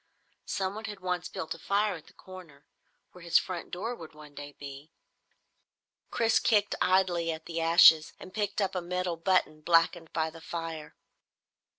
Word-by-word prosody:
Someone 200 +3 -3
had 210 -2 -7
once 180 -1 -3
built 160 - -5
a 165 - -13
fire 205 +3 +1
at 165 -4 -10
the - - -18
corner, 175 -7 -13 0.5
where 180 - -15
his 170 -1 +4
front 180 -3 -3
door 210 +7 -4
would 160 -6 -12
one 150 -1 -13
day 145 0 -9
be. 140 +2 -9 1.2
Chris 230 -1 +2
kicked 205 -2 +2
idly 180 -3 +2
at 160 0 -7
the 165 -1 -3
ashes 165 -1 +7
and 185 - -11
picked 205 -1 -1
up 195 - -2
a 180 - -2
metal 180 0 -2
button 165 -3 +1
blackened 165 0 +2
by 160 -1 -1
the 165 0 -13
fire. 165 -2 -6
170 Hz, 170 wpm, -29 LUFS, 160-190 Hz, 1.2 s, ashes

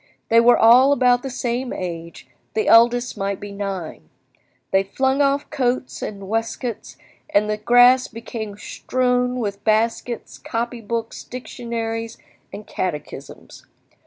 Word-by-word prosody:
They 230 - +6
were 240 +1 +6
all 250 +5 +6
about 250 -2 +3
the 270 - -5
same 245 0 -3
age, 170 -2 -6 0.3
the 435 - 0
eldest 240 +2 +4
might 195 0 -2
be 205 0 -8
nine. 195 -5 -6 0.6
They 195 - +4
flung 265 +8 0
off 280 +1 +1
coats 255 -3 -1
and 200 -2 -6
waistcoats, 225 +1 -4 0.3
and 210 +1 +2
the 210 0 -1
grass 245 +3 +5
became 225 -3 -7
strewn 250 +1 -1
with 200 -3 -4
baskets, 230 +2 -1
copy 235 +1 -4
books, 225 +1 -4
dictionaries, 230 -2 -5 0.3
and 205 +1 -9
catechisms. 150 -5 -6
230 Hz, 130 wpm, -21 LUFS, 205-250 Hz, 0.6 s, They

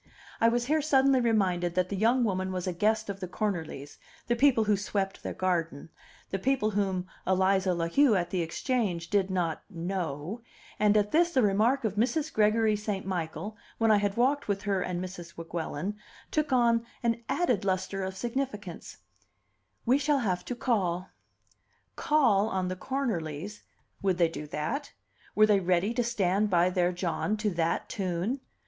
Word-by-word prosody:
I 230 - +5
was 240 +1 +1
here 305 +4 +2
suddenly 275 -3 +4
reminded 185 -7 +1
that 185 0 +1
the 200 - -2
young 235 +5 +3
woman 190 -3 -1
was 185 -1 -3
a 185 - -1
guest 220 +5 +1
of 200 -1 -5
the 185 - -4
Cornerlys, 165 -8 -4 0.3
the 240 - +1
people 250 -2 +4
who 210 -1 +3
swept 195 -1 -2
their - - -5
garden, 165 -5 -1 0.4
the 195 - -1
people 245 -1 +1
whom 190 -3 -1 0.2
Eliza 190 0 +2
La 165 -1 -1
Heu 265 +5 +4
at 175 -2 -1
the 185 - 0
Exchange 175 - -2
did 200 -2 +2
not 175 -4 -1
"know"; 175 - -4 0.4
and 210 0 +4
at 210 0 +1
this 340 +2 +4
the 260 -8 +2
remark 220 +7 +2
of 215 -2 -2
Mrs. 290 +7 0
Gregory 215 0 +3
St. 210 -2 -3
Michael, 185 +2 -4 0.2
when 225 -1 +3
I 210 - +6
had 205 0 -1
walked 275 +4 +2
with 200 -1 -1
her 200 -3 0
and 180 -1 -2
Mrs. 180 -2 -8
Weguelin, 165 +3 -4 0.3
took 305 -2 0
on 235 -2 +3 0.2
an 235 0 0
added 250 - +1
lustre 190 0 -1
of 190 0 -4
significance: 230 -6 -4 0.9
"We 255 +4 +4
shall 290 0 +2
have 180 -2 0
to 250 - -4
call." 190 -7 0 0.9
Call 230 -9 +3
on 185 -2 -1
the 185 - -3
Cornerlys! 200 - -3 0.4
Would 190 -3 +1
they 170 -2 +3
do 150 -2 -7
that? 155 - -3 0.4
Were 215 - +7
they 210 -2 +4
ready 185 +4 +1
to 245 - +1
stand 210 -3 +1
by 180 -1 +3
their 180 -1 +2
John 180 +4 -1
to 210 -1 0
that 170 -1 -1
tune? 190 +7 -2
200 Hz, 175 wpm, -29 LUFS, 180-230 Hz, 0.9 s, Were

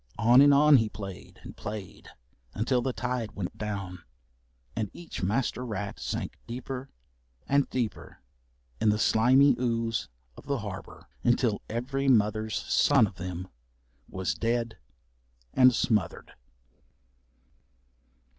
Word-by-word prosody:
On 120 +3 +6
and 145 0 +7
on 145 +1 +7
he 110 -3 +1
played 100 -2 -9
and - - -10
played 105 -3 -7 0.5
until 125 +3 +1
the 130 - -1
tide 125 -3 -3
went 95 -3 -5
down, 100 -4 -5 0.8
and 110 -3 -2
each 175 - -8
master 115 +6 -1
rat 105 -4 -5
sank - - -4
deeper 130 +2 -6 0.6
and 140 0 +2
deeper 120 -4 -4 0.6
in 110 - +3
the 105 - +3
slimy 130 +7 +5
ooze 115 -2 -1 0.3
of - - -14
the - - 0
harbour, - - -8 0.2
until 120 -3 +2
every 135 +4 -2
mother's 110 -3 +2
son 140 -6 +4
of 95 -4 -8
them 90 +1 -5 0.6
was 95 0 -2
dead 115 -3 -2 0.7
and 125 -2 +6
smothered. 105 - -1
115 Hz, 120 wpm, -28 LUFS, 105-125 Hz, 0.8 s, and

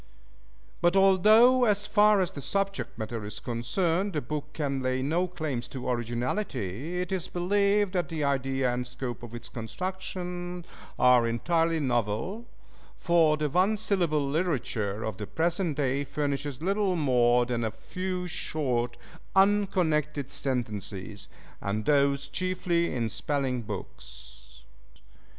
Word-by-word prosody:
But 175 +2 +3
although, 215 +7 +6
as 205 -2 +2
far 210 -1 +5
as 180 - 0
the 140 - -7
subject 195 +6 -2
matter 110 0 -4
is 105 0 -6
concerned, 165 - -1
the 150 - -1
book 150 +3 -5
can 140 -3 -2
lay 130 0 0
no 170 +6 +1
claims 155 -8 -4
to 130 -2 -6
originality, 125 - -2
it 180 +1 -3
is 185 -3 -2
believed 200 +2 +1
that 175 -5 0
the 160 -2 -2
idea 135 -2 +1
and 125 0 -3
scope 125 -1 -5
of 120 -1 -8
its 120 +1 -6
construction 180 - -5 0.3
are 125 -2 +5
entirely 165 +8 +1
novel, 125 - -1 0.5
for 165 -3 +3
the 150 0 0
One 185 +8 +2
Syllable 170 -9 +1
literature 130 - -1
of 110 - -4
the 105 - -5
present 170 -1 0
day 140 -1 0
furnishes 145 -1 -3
little 195 0 +1
more 125 -5 +3
than 120 -1 -2
a 110 - 0
few 185 - -4
short, 125 -8 -1 0.4
unconnected 180 -8 +2
sentences, 105 -8 -3 0.3
and 105 +2 -2
those 140 -1 +2
chiefly 175 +2 0
in 120 -3 -1
spelling 130 +1 -1
books. 65 - -10
145 Hz, 130 wpm, -28 LUFS, 125-180 Hz, 0.5 s, although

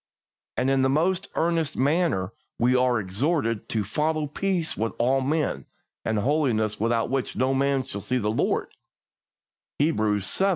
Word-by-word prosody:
And 135 - +2
in 135 -1 +3
the 130 - +3
most 170 +6 +1
earnest 165 -2 0
manner 140 - +1 0.2
we 125 +2 +3
are 125 -2 +3
exhorted 115 - -1
to 110 -2 0
"follow 150 +9 0
peace 175 +2 -1
with 115 +1 -2
all 130 +3 +2
men, 150 +2 -1 0.4
and 110 - 0
holiness, 115 -4 +1
without 115 +2 +1
which 135 -2 -1
no 130 +1 +1
man 135 0 +1
shall 110 -6 -6
see 130 +6 -1
the 105 -3 0
Lord" 110 - 0 1.1
(Hebrews 110 -9 +1
xii. 195 - +2
130 Hz, 155 wpm, -25 LUFS, 110-155 Hz, 1.1 s, in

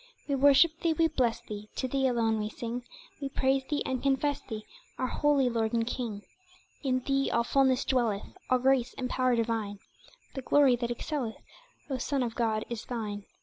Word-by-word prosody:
We 285 - 0
worship 285 +4 +5
Thee, 335 -1 +2
we 325 +1 +3
bless 240 -6 0
Thee 210 -2 -8
To 260 - -1
Thee 270 +1 +1
alone 225 -3 +1
we 210 0 -2
sing 235 +2 -5 0.4
We 275 - -2
praise 265 0 +1
Thee, 295 -1 0
and 260 -1 -2
confess 280 +1 +1
Thee 215 -3 -7 0.3
Our 255 - 0
holy 285 0 +2
Lord 230 -2 0
and 230 -1 +2
King 230 -4 -4 0.6
In 255 -2 0
Thee 275 +1 +1
all 235 - +2
fulness 265 +1 +2
dwelleth, 235 -6 +1 0.2
All 255 - +5
grace 260 -1 +2
and 250 -1 -3
power 255 -1 +2
divine, 225 -3 -1 0.6
The 265 - -4
glory 275 -1 +5
that 235 0 -2
excelleth, 240 -1 -3 0.5
O 265 -3 -3
Son 275 +1 0
of 235 -2 -3
God, 220 -2 0
is 235 -2 -5
Thine! 210 -4 -4
250 Hz, 190 wpm, -29 LUFS, 230-275 Hz, 0.6 s, worship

